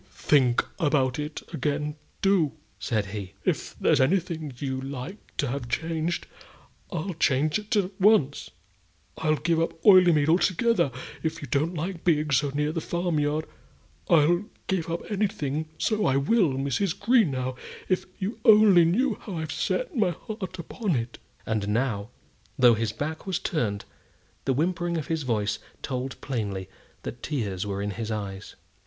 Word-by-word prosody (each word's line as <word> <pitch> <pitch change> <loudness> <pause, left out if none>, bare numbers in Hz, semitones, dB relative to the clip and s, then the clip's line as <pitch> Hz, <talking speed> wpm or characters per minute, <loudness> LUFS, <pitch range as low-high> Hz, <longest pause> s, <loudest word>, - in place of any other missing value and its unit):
"Do - - -29
think 130 -5 +3
about 145 -5 +2
it 150 +1 -5
again 150 +2 -1 0.3
do!" 190 -7 +3 0.3
said 105 +1 0
he. 100 -1 -6
"If - - -1
there's - - +3
anything 160 0 0
you 130 -1 -3
like 135 - -8
to - - +1
have 125 -2 -4
changed, 160 +7 -1 0.7
I'll 180 +1 -3
change 150 +1 +2
it 215 +2 -3
at 195 -2 +1
once. 185 -9 +3 0.7
I'll 155 -1 +2
give 160 +3 +1
up 165 0 -2
Oileymead 175 -7 +7
altogether, 185 - +3 0.3
if 160 - -2
you - - -5
don't 155 +8 0
like 165 +2 -4
being 155 -3 +2
so 140 +2 +3
near 150 +2 0
the 165 0 -2
farm 175 -2 -1
yard. 150 +1 0 0.6
I'll 170 +4 +4 0.2
give 180 -4 -1
up 170 +1 -2
anything; 160 -7 -1
so 215 -2 +1
I 135 - +3
will. 160 - +3
Mrs. 140 +8 -1
Greenow, 175 - +2 0.3
if 185 - 0
you 200 +5 -4
only 210 -6 +7
knew 225 +7 +1
how 195 -5 -6
I've 160 0 -3
set - - -1
my 210 -6 +3
heart 190 +1 -6
upon 180 - -2
it!" 120 -1 -3 0.3
And 110 -2 -1
now, 110 -1 0 0.5
though 125 -2 +7
his 110 -1 -1
back 155 - -5
was 185 -3 0
turned, 115 - -2 0.6
the 135 - +2
whimpering 170 +4 0
of 155 - -3
his 160 - -1
voice 110 -6 -1 0.2
told 130 0 -4
plainly 100 -8 -3 0.3
that 120 - -6
tears 105 - -2
were 100 0 -2
in 105 - -2
his 110 +1 -5
eyes. 100 -2 -5
155 Hz, 160 wpm, -26 LUFS, 130-180 Hz, 0.7 s, Oileymead